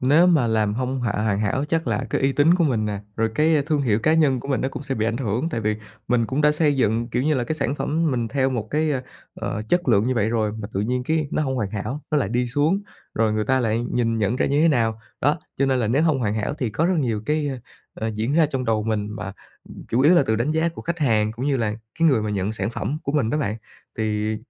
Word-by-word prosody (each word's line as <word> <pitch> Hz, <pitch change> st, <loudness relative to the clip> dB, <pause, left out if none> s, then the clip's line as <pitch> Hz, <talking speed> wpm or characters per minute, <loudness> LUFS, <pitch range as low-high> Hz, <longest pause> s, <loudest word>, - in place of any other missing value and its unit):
Nếu 150 Hz, +7 st, +5 dB
mà 155 Hz, -9 st, +4 dB
làm 110 Hz, -2 st, +1 dB
hông 130 Hz, +2 st, -2 dB
hà 115 Hz, -, 0 dB
hoàn 105 Hz, -2 st, 0 dB
hảo, 110 Hz, +6 st, 0 dB
chắc 165 Hz, -2 st, 0 dB
là 115 Hz, +2 st, -1 dB
cái -, -, 0 dB
uy 135 Hz, 0 st, +2 dB
tín 150 Hz, +5 st, +4 dB
của 175 Hz, -2 st, +2 dB
mình 115 Hz, -8 st, +1 dB
nè, 105 Hz, -1 st, -3 dB, 0.2 s
rồi 115 Hz, 0 st, +1 dB
cái 155 Hz, -1 st, +3 dB
thương 150 Hz, -2 st, +1 dB
hiệu 110 Hz, -5 st, +2 dB
cá 155 Hz, -, +3 dB
nhân 140 Hz, -6 st, +3 dB
của 135 Hz, -, -9 dB
mình 135 Hz, -, +1 dB
nó 130 Hz, -, 0 dB
cũng 135 Hz, -, -7 dB
sẽ 135 Hz, -1 st, -2 dB
bị 110 Hz, -1 st, 0 dB
ảnh 115 Hz, -, -1 dB
hưởng. 120 Hz, +4 st, -1 dB
Tại 135 Hz, -9 st, -3 dB
vì 110 Hz, -1 st, 0 dB, 0.3 s
mình 115 Hz, -1 st, +2 dB
cũng 135 Hz, +5 st, -1 dB
đã 150 Hz, 0 st, +4 dB
xây 150 Hz, -2 st, +3 dB
dựng, 115 Hz, -1 st, +1 dB
kiểu 125 Hz, +1 st, -1 dB
như 155 Hz, +2 st, +2 dB
là, 125 Hz, -, 0 dB
cái 155 Hz, -, -2 dB
sản 140 Hz, -3 st, -1 dB
phẩm 160 Hz, +2 st, 0 dB
mình 120 Hz, -3 st, -1 dB
theo 135 Hz, 0 st, +1 dB
một 115 Hz, -4 st, -3 dB
cái, 155 Hz, +1 st, +1 dB
ơ, 130 Hz, -3 st, -1 dB, 0.3 s
ờ, 105 Hz, -, -4 dB
chất 175 Hz, -4 st, +1 dB
lượng 105 Hz, -3 st, +4 dB
như 130 Hz, -, +1 dB
vậy 110 Hz, -2 st, +1 dB
rồi, 110 Hz, -2 st, 0 dB
mà 110 Hz, -1 st, -6 dB
tự 95 Hz, -, -1 dB
nhiên 125 Hz, +4 st, -1 dB
cái 155 Hz, 0 st, 0 dB
nó -, -, 0 dB
hông 135 Hz, -3 st, -1 dB
hoàn 105 Hz, -5 st, -2 dB
hảo, 110 Hz, +8 st, -4 dB
nó 150 Hz, -, +3 dB
lại 125 Hz, -, 0 dB
đi 120 Hz, +3 st, 0 dB
xuống, 150 Hz, +10 st, +1 dB, 0.3 s
rồi 110 Hz, -1 st, +2 dB
người 110 Hz, 0 st, 0 dB
ta 130 Hz, +1 st, +2 dB
lại 115 Hz, -2 st, +1 dB
nhìn 115 Hz, -2 st, +1 dB
nhận 105 Hz, +3 st, 0 dB
ra -, -, +1 dB
như 145 Hz, +2 st, +2 dB
thế 165 Hz, -, +5 dB
nào? 115 Hz, -6 st, +1 dB, 0.2 s
Đó, 145 Hz, +3 st, +2 dB, 0.2 s
cho 135 Hz, -, +2 dB
nên 130 Hz, -1 st, +2 dB
là 115 Hz, -3 st, 0 dB
nếu 135 Hz, +7 st, +2 dB
hông 155 Hz, -4 st, +2 dB
hoàn 110 Hz, -4 st, -1 dB
hảo 110 Hz, +5 st, -2 dB
thì 125 Hz, -6 st, -2 dB
có 155 Hz, +10 st, 0 dB
rất 180 Hz, -1 st, +1 dB
nhiều 115 Hz, -7 st, -1 dB
cái, 150 Hz, -1 st, 0 dB, 0.4 s
ơ, 110 Hz, 0 st, -3 dB
diễn 110 Hz, +5 st, -1 dB
ra 160 Hz, -2 st, +5 dB
trong 135 Hz, -3 st, -3 dB
đầu 110 Hz, -2 st, +1 dB
mình, 105 Hz, -2 st, -1 dB
mà, 100 Hz, -3 st, -5 dB, 0.4 s
ừm, -, -, -11 dB
chủ 120 Hz, -, +1 dB
yếu 150 Hz, +6 st, +6 dB
là 170 Hz, -, +5 dB
từ 110 Hz, -, +2 dB
đánh 120 Hz, +7 st, 0 dB
giá 160 Hz, +2 st, +1 dB
của 165 Hz, -, -9 dB
khách 170 Hz, +1 st, -3 dB
hàng, 110 Hz, -7 st, +2 dB
cũng 125 Hz, +5 st, -4 dB
như 140 Hz, -2 st, +2 dB
là 110 Hz, -3 st, -1 dB, 0.2 s
cái 165 Hz, 0 st, +5 dB
người 130 Hz, -7 st, +2 dB
mà 105 Hz, -, -2 dB
nhận 100 Hz, 0 st, -1 dB
sản 110 Hz, -, -2 dB
phẩm 140 Hz, +5 st, -3 dB
của 140 Hz, -, -3 dB
mình 130 Hz, -7 st, +1 dB
đó 150 Hz, -, 0 dB
bạn, 105 Hz, -6 st, -1 dB, 0.4 s
thì 110 Hz, 0 st, -1 dB
125 Hz, 290 wpm, -23 LUFS, 110-150 Hz, 0.4 s, yếu